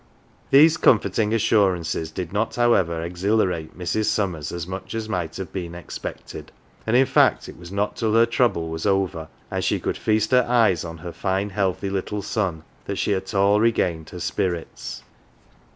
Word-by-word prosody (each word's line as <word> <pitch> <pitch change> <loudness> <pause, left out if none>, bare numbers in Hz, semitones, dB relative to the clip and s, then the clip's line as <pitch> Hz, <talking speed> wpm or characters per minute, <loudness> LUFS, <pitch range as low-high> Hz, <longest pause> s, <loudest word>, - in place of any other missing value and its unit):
These 155 +4 +6
comforting 110 -4 +3
assurances 95 -8 +1
did 85 +2 -6
not, 110 +2 -1
however, 90 -9 +2
exhila 100 +4 +1
rate 80 -3 -6
Mrs. 90 +4 -1
Summers 90 -9 -1
as 85 -1 -4
much 95 +4 -6
as 110 -1 -3
might 90 -6 -3
have 95 -1 -7
been 85 -3 -5
expected, 85 - -8 0.4
and 110 - +2
in 130 +2 +6
fact - - +3
it - - -10
was 85 +1 -12
not 100 +1 -2
till 110 -1 0
her 115 +1 +6
trouble 115 -8 +1
was 80 +4 -3
over 95 -5 0 0.2
and - - -2
she - - +1
could - - -3
feast 110 0 +1
her 125 -1 +5
eyes 110 -9 +3
on 85 0 -7
her 85 +1 -7
fine 95 +1 -1
healthy 95 0 -1
little 100 +1 -3
son 90 -8 -2 0.2
that 100 - -3
she 105 - +1
at 95 +2 -4
all 100 +1 +4
regained 90 -8 +1
her 90 - -8
spirits. 85 0 -3
95 Hz, 180 wpm, -23 LUFS, 85-110 Hz, 0.4 s, These